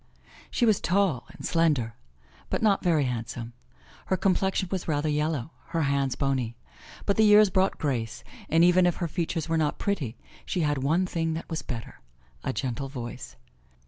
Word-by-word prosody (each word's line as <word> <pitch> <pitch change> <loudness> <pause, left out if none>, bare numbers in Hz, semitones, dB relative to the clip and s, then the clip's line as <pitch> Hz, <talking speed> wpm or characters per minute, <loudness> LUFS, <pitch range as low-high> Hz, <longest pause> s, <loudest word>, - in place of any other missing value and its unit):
She 240 - +1
was 215 -4 +3
tall 180 -8 +1
and 170 - -9
slender, 150 -10 +2 0.6
but - - -1
not 205 -3 +3
very 165 -5 +3
handsome. 120 -1 -4 0.5
Her 190 - +1
complexion 190 0 +1
was 190 -2 -2
rather 150 -1 0
yellow, 150 -2 -1 0.2
her 165 -1 0
hands 140 -2 +1
bony. 130 -4 -1 0.5
But 200 - +1
the 220 - +5
years 210 -1 +7
brought 190 +1 +2
grace, 120 -7 -2 0.3
and 165 +2 +5
even 180 +1 +5
if 175 - +1
her 170 - -2
features 165 0 -2
were 165 0 +1
not 150 -1 0
pretty 150 - -2 0.3
she 180 - -2
had 145 -3 +1
one 160 +8 +2
thing 165 -2 -1
that 165 - -7
was 160 - -2
better, 115 -3 -7 0.4
a - - -1
gentle 130 +1 -3
voice. 120 -4 -7
160 Hz, 175 wpm, -27 LUFS, 135-180 Hz, 0.6 s, years